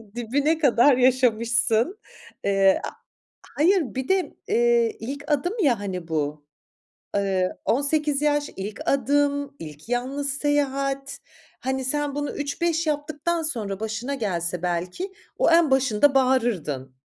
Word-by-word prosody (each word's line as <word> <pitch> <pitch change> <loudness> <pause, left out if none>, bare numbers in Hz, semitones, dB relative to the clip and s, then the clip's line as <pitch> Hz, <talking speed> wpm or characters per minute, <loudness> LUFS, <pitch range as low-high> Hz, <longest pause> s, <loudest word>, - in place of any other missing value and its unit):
dibine 280 +7 +1
kadar 270 -2 +4
yaşamışsın. 240 - +2 0.5
Eee, 195 -1 +3
a - - -3 0.7
hayır, 365 +5 +4
bir 260 0 -3
de, 380 -1 +1
eee, 470 0 +2
ilk 280 +5 -5
adım 295 +6 +1
ya, 245 -8 +3
hani 185 -4 -5
bu, 150 -2 -2 0.7
ııı, 190 -2 0
18 290 +2 +1
yaş, 295 -1 +1
ilk 200 +2 -6
adım, 285 0 +1
ilk 155 +4 -10
yalnız 270 +3 -1
seyahat. 275 -1 -1 0.4
Hani, 265 0 -2
sen 290 +1 -1
bunu 290 0 -2
üç 290 +2 -4
beş 335 -1 +1
yaptıktan 305 +3 -1
sonra 215 - -3
başına 220 +5 -3
gelse 180 -6 -2
belki, 180 - -2 0.3
o - - +3
en 330 -4 +5
başında 270 +1 +3
bağırırdın. 205 - +1
270 Hz, 125 wpm, -24 LUFS, 215-290 Hz, 0.7 s, en